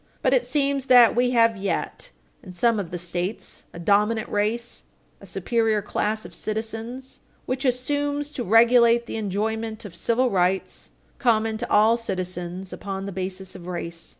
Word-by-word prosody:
But - - +3
it - - +4
seems 280 -2 0
that 245 -3 +7
we 245 +1 +3
have 230 -2 +4
yet, 195 0 -3 0.3
in 185 - -11
some 230 +4 +2
of 185 -5 -4
the 175 - -4
States, 175 +4 -4
a - - -11
dominant 210 +5 +2
race 220 +4 -2 0.3
a - - -12
superior 225 -3 0
class 215 +1 -2
of - - -10
citizens, 225 +4 -5 0.3
which 260 +2 -3
assumes 285 +3 -1
to 255 - -4
regulate 235 +2 +5
the - - -5
enjoyment 220 +2 -3
of 195 - -8
civil 235 +8 +1
rights, 185 0 0 0.3
common 220 -2 +2
to 240 - -4
all 220 +2 +5
citizens, 185 -3 -5
upon 195 -1 -5
the 200 - -5
basis 190 0 -5
of 180 -2 -10
race. 170 -2 -6
220 Hz, 160 wpm, -24 LUFS, 190-240 Hz, 0.3 s, that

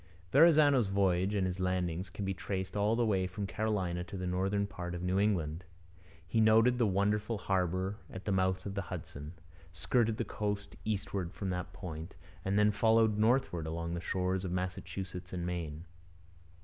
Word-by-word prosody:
Verrazano's 145 -5 +6
voyage 95 0 +2
and 95 -2 +2
his 90 0 -3
landings 90 -1 -1
can 100 +2 -5
be 95 - 0
traced 95 0 -4
all 105 +2 +2
the 120 0 +2
way 95 -4 +1
from 95 +2 -4
Carolina 95 -5 -1
to 100 - -7
the 90 - -3
northern 95 +3 0
part 90 -3 -5
of 90 - -5
New 90 +2 +1
England. 90 -5 0 0.6
He 115 - +2
noted 115 +3 +5
the 115 - +4
wonderful 105 +3 +1
harbour 95 0 0
at 95 - -8
the 105 - 0
mouth 95 -1 +1
of 100 - -4
the 100 - -2
Hudson, 75 -3 -7 0.4
skirted 110 +6 +1
the - - -1
coast 105 -1 -3
eastward 100 -4 -2
from 95 -2 -3
that 90 0 -3
point, 80 0 -7 0.3
and 95 +1 0
then 105 0 +5
followed 110 0 +3
northward 110 -8 +2
along 85 +1 -3
the 85 - -3
shores 90 +1 -1
of 90 - -3
Massachusetts 90 0 -4
and 90 -1 -3
Maine. 85 -2 -4
95 Hz, 175 wpm, -32 LUFS, 90-105 Hz, 0.6 s, Verrazano's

